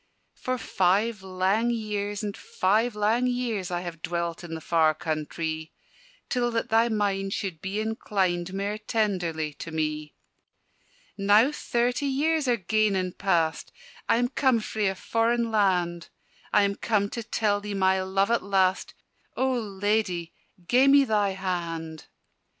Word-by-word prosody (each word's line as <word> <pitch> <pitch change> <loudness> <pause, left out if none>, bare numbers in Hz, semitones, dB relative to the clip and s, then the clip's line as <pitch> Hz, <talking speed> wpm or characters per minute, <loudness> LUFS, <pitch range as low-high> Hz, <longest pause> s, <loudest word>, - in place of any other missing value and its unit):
"For 255 0 -3
five 205 +1 +1
lang 190 +5 0
years, 210 -3 -2
and 205 -1 -3
five 215 +5 0
lang 220 +4 +2
years, 235 -6 -2
I 175 -1 -2
have 170 -2 -7
dwelt 170 0 -3
in 165 -1 -6
the - - -5
far 160 -1 +2
countrie, 160 0 -3 0.6
Till 245 -2 0
that 230 -1 -2
thy 225 +1 +4
mind 200 -3 0
should 185 -6 -4
be 195 +2 -3
inclined 190 -5 -1
Mair 200 +2 -3
tenderly 180 -9 -1
to - - -6
me. 155 -1 -3 1.0
"Now 210 +7 +5
thirty 245 -1 -1
years 300 +2 +1
are 240 -1 +3
gane 215 +1 +1
and 185 -1 -2
past, 165 -5 0 0.4
I - - +5
am 245 +1 +1
come 260 -3 +2
frae 215 -1 -1
a 190 - 0
foreign 230 +3 0
land: 180 -5 +1 0.4
I 210 - +5
am 200 0 0
come 210 -3 +1
to 235 - -4
tell 215 -2 0
thee 205 0 -5
my 190 -1 +2
love 195 +3 +1
at 235 - +2
last 190 -1 +1 0.4
O 260 0 +2
Ladye, 205 -5 -1 0.4
gie 255 +2 +5
me 280 0 +7
thy 210 -5 +1
hand!" 170 -4 -4
200 Hz, 150 wpm, -26 LUFS, 180-225 Hz, 1.0 s, me